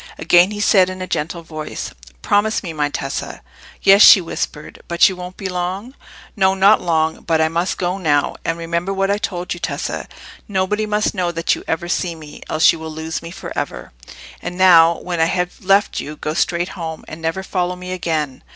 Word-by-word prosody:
Again 175 +2 +5
he 210 0 -6
said, 190 -3 +4
in 185 0 -7
a 185 - -4
gentle 170 0 -3
voice— 155 -1 -6 0.3
"Promise 215 +2 +1
me, 170 -4 -5
my 150 -1 0
Tessa." 135 -1 -5 0.4
"Yes," 195 +1 +7
she 200 - +10
whispered. 160 -3 -5
"But 170 0 +5
you 190 - -2
won't 180 0 -9
be 195 - -4
long?" 185 +6 -4 0.4
"No, 190 -2 +3
not 195 +3 +5
long. 160 -2 0
But 165 -2 0
I 160 0 +3
must 170 +3 -1
go 180 +1 -2
now. 145 -5 +1
And 165 0 -1
remember 170 +3 -2
what 195 +1 +1
I 205 - 0
told 180 -3 -3
you, 175 - -9
Tessa. - - -4 0.4
Nobody 205 +1 -1
must 210 0 0
know 180 -4 -1
that 165 0 +1
you - - -5
ever 165 +1 -2
see 175 -1 -1
me, 155 -2 -12
else 155 +1 +4
you 165 - -7
will 160 0 -6
lose 160 +1 -5
me 165 - -8
for 170 - -8
ever. - - -4 0.5
And 180 - -6
now, 170 -3 +6
when 175 -2 -4
I 160 - +4
have 180 +2 -2
left 195 +2 +2
you, 150 - -6
go 150 - -4
straight 175 +2 0
home, 160 -3 -7
and 155 +1 -9
never 165 +4 -2
follow 180 -1 -2
me 180 0 -8
again. 155 -7 -2
175 Hz, 205 wpm, -19 LUFS, 160-190 Hz, 0.5 s, she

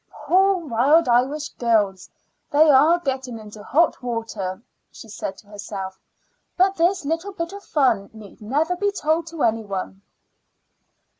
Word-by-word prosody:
"Poor 380 +5 +4
Wild 280 +8 +3
Irish 265 +5 +1
Girls! 210 -6 0 0.4
they 305 +1 +5
are 305 +5 +5
getting 265 -7 -4
into 215 -1 -11
hot 320 +10 +1
water," 225 -6 -4 0.3
she - - -12
said 200 -2 -6
to 210 - -17
herself. 195 -2 -7 0.6
"But 380 +1 +3
this 355 0 +1
little 330 +6 -2
bit 335 0 -5
of 400 - -8
fun 245 -9 +1
need 215 -2 -14
never 295 +11 0
be 405 +2 0
told 320 -3 -1
to 330 -2 -4
any 225 -1 +1
one." 195 -1 -5
265 Hz, 145 wpm, -22 LUFS, 215-330 Hz, 0.6 s, they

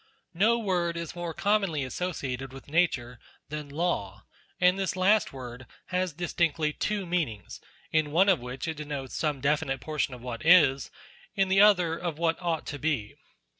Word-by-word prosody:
No 215 +7 +3
word 175 -6 -1
is 170 0 -5
more 175 -1 -4
commonly 195 -6 +1
associated 135 -3 -4
with 135 0 -11
the - - -16
word - - -7
Nature, 125 -9 +1 0.3
than 150 -1 -6
Law; 145 - -2 0.4
and 180 +2 +4
this 190 -2 -1
last 200 +3 +3
word 125 -2 -9 0.2
has 185 0 0
distinctly 160 -2 0
two 205 +2 -2
meanings, 160 - -3 0.3
in 155 -2 +2
one 180 +6 +4
of 190 -5 +4
which 125 +4 -6
it 160 -2 -3
denotes 145 -3 -5
some 150 -4 -1
definite 140 -2 0
portion 150 -2 -2
of 125 - -13
what 120 -2 -5
is, 150 -6 +5 0.5
in 195 -2 +2
the 195 +1 +5
other, 180 -6 +5
of 170 -2 -4
what 165 +1 0
ought 170 -3 -1
to 145 - -6
be. 135 -9 -1
160 Hz, 175 wpm, -28 LUFS, 135-180 Hz, 0.5 s, is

